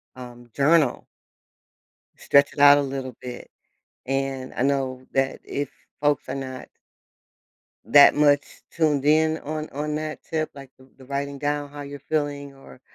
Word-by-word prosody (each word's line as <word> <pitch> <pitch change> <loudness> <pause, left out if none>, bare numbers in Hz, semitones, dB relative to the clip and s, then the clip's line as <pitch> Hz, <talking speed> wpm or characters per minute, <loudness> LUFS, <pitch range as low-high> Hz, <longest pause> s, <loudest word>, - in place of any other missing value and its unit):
um, 120 -1 -11
journal. 145 -1 +2 1.1
Stretch 140 0 +3
it - - -9
out 145 0 +8
a - - +2
little 135 -2 -5
bit. 125 -1 -8 0.6
And 135 -1 -3
I - - -2
know 135 -2 -1
that 135 0 0
if 145 -1 -4 0.3
folks 145 -2 +1
are - - -3
not 130 -1 -7 1.2
that 145 -1 +7
much 145 -1 +4 0.3
tuned 150 -4 +1
in 155 +1 +3
on 155 +1 -5
on 150 +2 -3
that 155 0 -4
tip, 155 -1 -2
like, 135 -2 -12
th 130 0 -20
the 130 - -15
writing 140 +1 -4
down 145 0 -2
how 145 0 -9
you're 145 0 -8
feeling, 145 -2 -2
or 135 -1 -16
140 Hz, 155 wpm, -24 LUFS, 135-145 Hz, 1.2 s, out